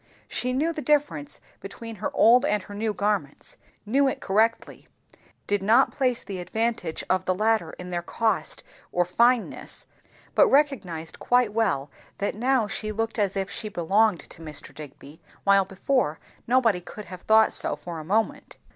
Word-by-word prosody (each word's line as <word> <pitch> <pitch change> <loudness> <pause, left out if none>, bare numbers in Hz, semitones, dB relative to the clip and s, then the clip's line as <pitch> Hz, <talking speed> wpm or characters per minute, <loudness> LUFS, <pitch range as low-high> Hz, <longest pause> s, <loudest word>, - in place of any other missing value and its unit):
She 250 - -1
knew 305 +6 0
the 310 - -5
difference 295 -1 0 0.2
between 230 -2 -9
her - - -2
old 245 +4 +6
and 210 -9 +1
her 205 - -11
new 215 +2 -1
garments, 200 -8 -2 0.3
knew 270 +6 +3
it 265 - -2
correctly; 220 +4 0 0.6
did 205 -1 0
not 230 +7 +4
place 255 -4 0
the 195 -2 -6
advantage 220 -3 -2
of 185 0 +1
the 185 - +1
latter 215 -5 +1
in 180 0 -8
their 175 -1 -1
colour 220 +5 0 0.5
or 175 0 +2
fineness; 235 +6 +1 0.5
but - - +6
recognized 205 - 0
quite 245 -4 +2
well 185 -12 0 0.3
that 200 - -1
now 250 +2 +1
she 215 +1 -4
looked 225 +1 -3
as 200 -1 0
if 195 0 -2
she 215 - -4
belonged 195 +2 +2
to - - -12
Mr. 155 -2 -5
Digby, 150 +1 -12 0.2
while 195 -1 +4
before, 190 - -1 0.3
nobody 230 -7 +3
could 205 +4 -10
have 180 +1 -10
thought 220 0 +4
so - - 0
for 170 -2 -7
a - - -7
moment. 225 - -1
210 Hz, 165 wpm, -25 LUFS, 180-235 Hz, 0.6 s, old